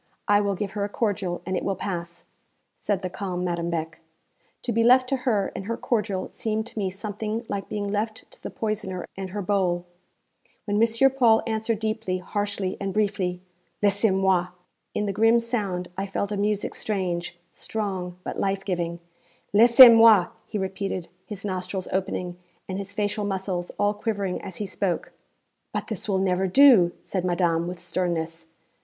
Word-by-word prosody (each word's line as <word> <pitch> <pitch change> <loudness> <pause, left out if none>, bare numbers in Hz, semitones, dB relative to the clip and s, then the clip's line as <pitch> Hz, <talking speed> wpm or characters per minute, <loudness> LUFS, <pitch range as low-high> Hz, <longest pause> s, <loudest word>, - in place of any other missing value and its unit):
I 205 -1 +5
will 200 -1 0
give 195 +1 -3
her 205 0 -2
a 205 - -2
cordial, 200 -5 -2
and 185 +1 -2
it - - -1
will 195 - 0
pass,' 175 -2 -5 0.5
said 200 -3 -2
the - - 0
calm 180 -2 -3
Madame 170 -1 -1
Beck. 165 -1 -3 0.6
To 245 - -1
be 230 0 +2
left 255 +2 +6
to 270 - +1
her 205 -4 +1
and 190 - -5
her 230 +2 -2
cordial 210 -5 -1
seemed 220 0 -2
to 230 - -7
me 195 -2 0
something 215 +4 -4
like 200 -1 -4
being 205 -1 -3
left 215 +2 -2
to - - -13
the - - -5
poisoner 195 -5 -3
and 190 -1 -5
her 205 +2 -4
bowl. 180 -3 0 0.8
When 205 0 +1
M. 230 +4 +4
Paul 235 -4 +4
answered 220 0 -1
deeply, 215 -3 -2
harshly, 200 0 -3
and 195 0 -3
briefly, 195 -4 0 0.4
'Laissez 205 +2 +4
moi!' 190 -2 +2 0.5
in 210 - 0
the 200 - -1
grim 225 +3 +4
sound 205 -7 -2
I 195 +2 -3
felt 200 +1 -2
a - - -1
music 205 0 0
strange, 180 -4 -2 0.2
strong, 190 -5 -4
but - - -5
life 195 0 -1
giving. 170 -3 -2 0.5
'Laissez 235 +4 +10
moi!' 225 -5 +7 0.2
he - - -3
repeated, 190 -2 -3 0.2
his 210 -2 -6
nostrils 185 -1 -3
opening, 180 -2 -2 0.3
and 190 +1 -3
his 200 0 -6
facial 205 +1 -1
muscles 190 -3 -2
all 205 0 +2
quivering 205 -3 -2
as 190 - -8
he 210 - -3
spoke. 190 -2 -2 0.6
'But - - -4
this 220 -1 -4
will 195 - +2
never 190 0 +1
do,' 215 -5 +7
said 185 -3 -3
madame 170 -2 +1
with 180 0 -6
sternness. 165 -2 -2
195 Hz, 175 wpm, -25 LUFS, 180-215 Hz, 0.8 s, Laissez